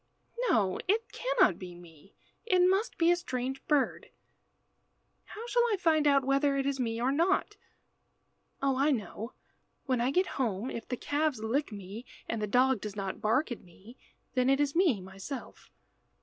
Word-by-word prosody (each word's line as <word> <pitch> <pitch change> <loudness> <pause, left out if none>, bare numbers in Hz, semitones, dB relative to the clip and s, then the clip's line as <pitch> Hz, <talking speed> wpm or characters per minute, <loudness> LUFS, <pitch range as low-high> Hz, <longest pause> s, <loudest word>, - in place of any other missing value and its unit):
"No, 195 -5 +2
it 440 +4 +1
cannot - - +2
be 180 -2 -8
me. 170 +1 -16 0.3
It 365 -4 +4
must 390 +5 +1
be 335 0 +4
a - - +5
strange 265 -6 -4
bird. 295 -3 +1 1.2
How 445 +2 -8
shall 485 0 +2
I 415 - +2
find 315 -4 +3
out 275 -2 +4
whether 275 +1 +2
it 270 - 0
is 275 -1 -1
me 230 -2 -1
or 250 +3 +1
not? 355 +7 +1 1.1
Oh, 270 -1 +2
I 280 +3 +3
know. 225 -2 -3 0.5
When 255 -3 +1
I 245 - +2
get 365 +7 +2 0.2
home, 225 0 -1
if 230 - -6
the 250 - -3
calves 290 -2 0
lick 250 +5 -1
me, 205 +4 -8 0.2
and 225 -1 -2
the 210 - -1
dog 250 +1 +3
does 210 -1 -6
not 195 +1 -4
bark 245 +6 +1
at 240 - -5
me, 190 +7 -16 0.4
then 255 0 +2
it 275 +1 +3
is 290 0 +1
me 330 - +3
myself." 195 +8 -8
260 Hz, 175 wpm, -30 LUFS, 215-300 Hz, 1.2 s, a